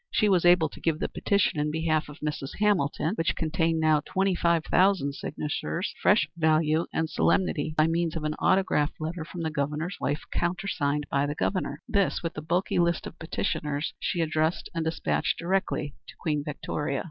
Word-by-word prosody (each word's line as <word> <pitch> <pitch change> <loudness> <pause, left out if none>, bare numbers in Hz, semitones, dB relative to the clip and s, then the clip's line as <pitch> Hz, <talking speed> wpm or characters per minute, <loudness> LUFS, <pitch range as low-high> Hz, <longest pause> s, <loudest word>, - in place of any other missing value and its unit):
She 215 - +2
was 180 -3 +3
able 175 -2 +6
to - - -12
give 165 -2 0
the - - -1
petition 200 -5 +1
in 150 +1 +1
behalf 155 0 0
of 150 - -12
Mrs. 150 -2 -4
Hamilton, 190 -5 +1
which 165 -7 0
contained 165 0 0
now 155 -1 +4
twenty 190 +5 0
five 170 -2 +2
thousand 185 -7 +3
signatures, 150 +6 -3
fresh 205 +3 +4
value 160 0 +2
and 160 - 0
solemnity 155 -2 +1
by 155 - +5
means 165 0 0
of 160 - -3
an 155 0 -1
autograph 185 -6 +2
letter 160 +1 -4
from 170 +1 -6
the 160 - -1
Governor's 150 +5 -2
wife, 145 +2 -1
countersigned 170 -5 -1
by 140 +1 +2
the 145 - -3
Governor. 155 -4 -2
This, 200 -7 +1
with 165 - -2
the 155 - -5
bulky 175 +4 0
list 170 -1 +1
of 165 - -9
petitioners, 155 -3 -2
she 175 - -1
addressed 155 +1 0
and 165 -1 -1
despatched 160 - 0
directly 180 -5 -1
to - - -11
Queen 150 -3 -1
Victoria. 145 -1 -3
160 Hz, 180 wpm, -27 LUFS, 150-175 Hz, -, able